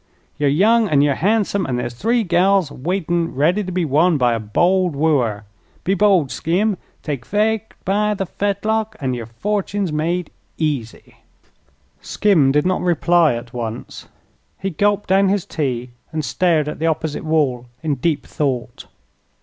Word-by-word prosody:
Yer 145 - +2
young, 210 +9 +3
an' 145 -3 +4
yer 145 -1 +3
han'some; 200 +2 +1
an' 130 - -1
there's 120 -1 -3
three 230 - +1
gals 180 -2 +2
waitin' 170 +3 -2
ready 170 +9 +2
to 185 - -5
be 180 -1 0
won 155 +4 +3
by 125 -3 +2
a 115 - -1
bold 175 - +1
wooer. 130 -9 +1 0.4
Be 190 - +1
bold, 190 -8 +3
Skim; 195 +6 0 0.3
take 140 -6 -4
fate 220 - -1
by 210 +2 +1
the 195 - -2
fetlock, 215 +3 -1
an' 130 -2 -1
yer 120 -3 -5
fortun's 200 - -2
made 170 +3 -1 0.3
easy!" 140 -8 -3 0.8
Skim 165 -10 +2
did 150 +3 +2
not 185 0 +1
reply 170 -4 +3
at 120 +1 -8
once. 115 -2 -6 0.5
He 195 - -3
gulped 205 +4 +1
down 195 +1 +4
his 200 -2 0
tea 125 -5 -3 0.2
and 155 -2 -3
stared 155 +4 +1
at 150 - -5
the 165 - 0
opposite 160 -1 -2
wall 145 -6 0 0.2
in 155 -2 0
deep 145 +3 -1
thought. 135 -5 -3
165 Hz, 160 wpm, -20 LUFS, 140-195 Hz, 0.8 s, an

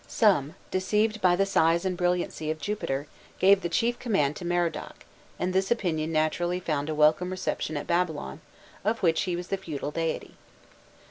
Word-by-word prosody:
Some, 185 - +2 0.2
deceived 210 +3 +1
by 180 -1 +5
the 195 +2 +2
size 170 -2 +2
and 185 -1 0
brilliancy 175 -3 -1
of 155 - -1
Jupiter, 150 -9 -2 0.3
gave 195 +1 +5
the 175 - -2
chief 235 +7 0
command 150 - +1
to 175 - -7
Merodach, 175 -2 -2 0.3
and 180 +1 -1
this 190 +1 +1
opinion 165 -9 0
naturally 175 +3 0
found 155 -4 -2
a 155 - -1
welcome 155 +4 +4
reception 185 -4 -2
at 145 - -4
Babylon, 160 - -1 0.4
of 220 +2 -1
which 165 -2 +3
he 175 - 0
was 175 +1 -6
the 195 - 0
feudal 150 -6 -5
deity. 165 +1 -3
175 Hz, 175 wpm, -27 LUFS, 155-190 Hz, 0.4 s, by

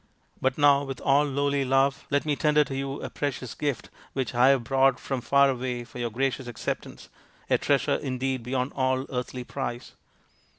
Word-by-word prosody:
But 130 0 +1
now, 145 -1 +5
with 135 -2 -6
all 140 +1 +3
lowly 140 0 0
love, 135 +1 +1
let 140 +1 +1
me 150 -1 +1
tender 150 0 +3
to 135 - -6
you 135 +1 -4
a - - -4
precious 130 -4 -3
gift 145 -4 -3 0.2
which 130 -3 -2
I 120 +2 +5
have 135 -3 +4
brought 135 +2 +3
from 135 -2 -3
far 140 +3 +4
away 125 -2 -2
for 120 - -11
your 120 -1 -1
gracious 130 +2 -2
acceptance, 120 -3 -5 0.4
a - - +4
treasure - - +2
indeed 130 0 -2
beyond 125 +2 -2
all 130 0 0
earthly 125 0 -4
price." 125 -2 -5
135 Hz, 180 wpm, -26 LUFS, 125-140 Hz, 0.4 s, now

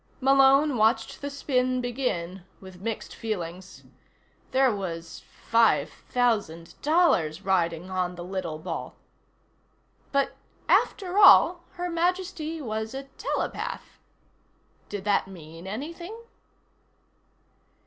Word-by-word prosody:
Malone 275 +1 +5
watched 225 +1 +1
the 285 - -3
spin 255 -3 0
begin 210 -8 -3 0.2
with 190 -1 -13
mixed 225 +1 -4
feelings. 185 -4 -6 0.7
There 260 -3 +3
was 170 -4 -6 0.2
five 230 -1 +3
thousand 205 -10 -1
dollars 205 - +2
riding 175 -1 0
on 180 -1 -1
the 175 - -7
little 180 -4 -4
ball. 155 +4 -6 1.2
But, 275 -1 +1 0.4
after 380 0 +2
all, 350 -3 +7
Her 355 0 -3
Majesty 345 -1 -1
was 220 -2 -4
a 270 - -4 0.2
telepath. - - -4 0.9
Did 205 -2 -5
that 205 -2 +2
mean 165 -1 -11
anything? 335 - -6
225 Hz, 100 wpm, -26 LUFS, 185-280 Hz, 1.2 s, all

